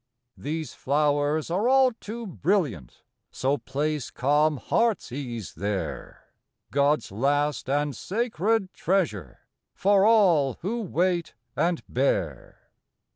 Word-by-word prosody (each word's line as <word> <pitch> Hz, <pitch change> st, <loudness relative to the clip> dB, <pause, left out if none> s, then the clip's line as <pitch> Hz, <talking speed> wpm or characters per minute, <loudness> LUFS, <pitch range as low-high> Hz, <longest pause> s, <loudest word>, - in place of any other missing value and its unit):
These 155 Hz, +1 st, -4 dB
flowers 145 Hz, +2 st, 0 dB
are 205 Hz, +8 st, +1 dB
all 265 Hz, -1 st, +5 dB
too 230 Hz, +1 st, -7 dB
brilliant, 160 Hz, -, -1 dB, 0.3 s
So 135 Hz, +2 st, -1 dB
place 150 Hz, +1 st, -2 dB
calm 150 Hz, +3 st, +2 dB
heart's 230 Hz, -, 0 dB
ease 120 Hz, -, -5 dB
there, 95 Hz, -1 st, -5 dB, 0.4 s
God's 140 Hz, -1 st, +1 dB
last 140 Hz, +5 st, 0 dB
and 145 Hz, 0 st, 0 dB
sacred 215 Hz, -1 st, -1 dB
treasure 150 Hz, -, -1 dB, 0.3 s
For 200 Hz, 0 st, +3 dB
all 180 Hz, -, +4 dB
who 230 Hz, +6 st, -2 dB
wait 175 Hz, -3 st, -1 dB, 0.2 s
and 170 Hz, +4 st, 0 dB
bear. 95 Hz, -, -2 dB
150 Hz, 105 wpm, -26 LUFS, 135-190 Hz, 0.4 s, all